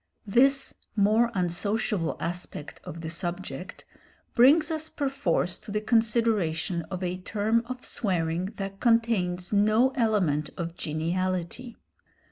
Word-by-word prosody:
This 270 +6 +3 0.2
more 215 +3 +4
unsociable 185 0 0
aspect 175 -3 -5
of 165 - -8
the 160 - -4
subject 175 -2 -5 0.5
brings 295 +6 +5
us 315 0 -3
perforce 265 - -1
to 215 - -13
the 210 - 0
consideration 215 -7 +1
of 185 -1 -4
a 180 0 -2
term 220 +4 +1
of 255 0 -6
swearing 175 -4 -1
that 195 0 -5
contains 220 -7 +1
no 215 +5 +4
element 200 - +1
of 170 -1 -4
geniality. 180 +8 -3
200 Hz, 115 wpm, -27 LUFS, 175-230 Hz, 0.5 s, brings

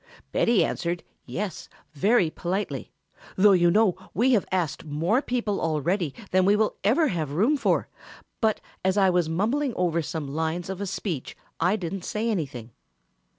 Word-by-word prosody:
Betty 230 -3 +3
answered, 170 0 -2 0.2
'Yes' 200 -4 -4 0.2
very 190 - +3
politely, 185 +6 -3 0.4
though 205 +2 +6
you 175 -2 +5
know 205 0 +4 0.2
we 245 +7 +3
have 220 -6 +2
asked 175 -6 -1
more 165 - +1
people 235 -7 -1
already 165 +2 0 0.2
than 185 0 +4
we 200 +2 +4
will 215 0 +1
ever 270 - +3
have 155 -6 -2
room 220 - +3
for, 280 - +1 0.5
but 220 -2 +2 0.2
as 190 +2 +1
I 190 -2 +5
was 175 -3 +1
mumbling 235 - 0
over 170 -2 +1
some 160 -2 -4
lines 160 +5 -2
of 190 +1 -6
a 200 - -2
speech 180 - -4 0.2
I 185 - +3
didn't 190 -2 -4
say 225 +4 -1
anything. 135 - -4
185 Hz, 160 wpm, -26 LUFS, 165-210 Hz, 0.5 s, though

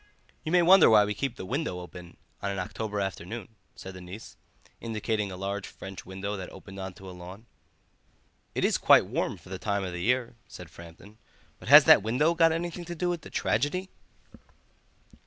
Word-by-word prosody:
"You 155 - -4
may 175 0 +5
wonder 190 +3 +7
why 105 -2 +6
we 105 - -2
keep 125 +4 -3
that 95 - -7
window 135 - -2
wide 90 - -6
open 90 -1 -12 0.2
on 100 - -2
an 100 - -3
October 105 +2 -4
afternoon," 95 +2 -5 0.3
said 95 - -9
the 95 - -10
niece, 95 +5 -10 0.4
indicating 110 -2 -2
a 90 - -7
large 100 +1 -4
French 95 -2 -10
window 95 +2 -4
that 95 - -7
opened 95 -1 -11
on 95 -1 -6
to 95 - -12
a - - -7
lawn. 90 +5 -11 1.1
"It - - +1
is - - +2
quite - - +6
warm - - -2
for - - -17
the 95 0 -6
time 100 -2 -1
of 90 -2 -4
the 90 - -5
year," 125 +4 0
said 90 -2 -11
Framton; 85 +6 -14 0.4
"but - - -9
has - - +11
that - - +7
window 125 +10 +2
got 165 -1 +4
anything 170 +2 -3
to 175 +1 -6
do 175 +2 -1
with 175 -2 -2
the - - -11
tragedy?" 180 - -1
105 Hz, 200 wpm, -28 LUFS, 95-130 Hz, 1.1 s, has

